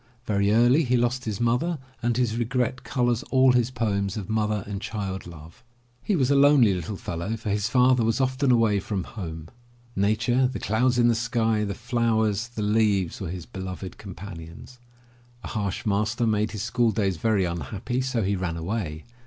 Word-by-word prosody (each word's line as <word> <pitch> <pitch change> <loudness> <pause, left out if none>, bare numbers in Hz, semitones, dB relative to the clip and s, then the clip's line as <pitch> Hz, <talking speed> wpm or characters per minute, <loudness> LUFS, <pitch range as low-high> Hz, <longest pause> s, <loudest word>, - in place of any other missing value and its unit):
Very 100 -1 +1
early 120 +8 +5
he 125 -2 +2
lost 120 +1 0
his 110 -2 -3
mother, 125 +9 +1 0.2
and 120 0 0
his 120 -3 +1
regret 125 +2 -1
colors 120 -2 0
all 130 -1 +5
his 120 -1 +2
poems 100 -5 -1
of 100 -2 -6
mother 105 -2 0
and 100 -1 -5
child 95 -5 -4
love. 80 +2 -13 0.4
He 205 - 0
was 135 -4 +2
a - - +4
lonely 140 -6 +6
little 90 +3 -4
fellow 90 +7 -4
for 110 -2 -4
his 105 +1 0
father 125 -1 +4
was 115 +2 +1
often 130 +1 +1
away 115 -4 +3
from 100 -1 -3
home. 80 -6 -7 0.5
Nature, 115 +6 +2
the 125 -3 -4
clouds 120 +6 +1
in 120 -1 +4
the 120 - +4
sky, 115 -2 0
the 100 -2 -3
flowers, 110 -3 0
the 115 -3 -5
leaves, 105 -4 +1
were 95 - -4
his 90 -2 -6
beloved 95 0 -7
companions. 95 +3 -10 0.6
A - - -6
harsh 105 +3 -3
master 105 +3 0
made 105 -1 +1
his 105 -3 -5
school 120 0 +1
days 100 -4 0
very 105 0 +1
unhappy, 90 - -3
so 130 -3 -1
he 100 +1 0
ran 90 -3 -3
away. 85 -3 -3
110 Hz, 185 wpm, -25 LUFS, 100-120 Hz, 0.6 s, lonely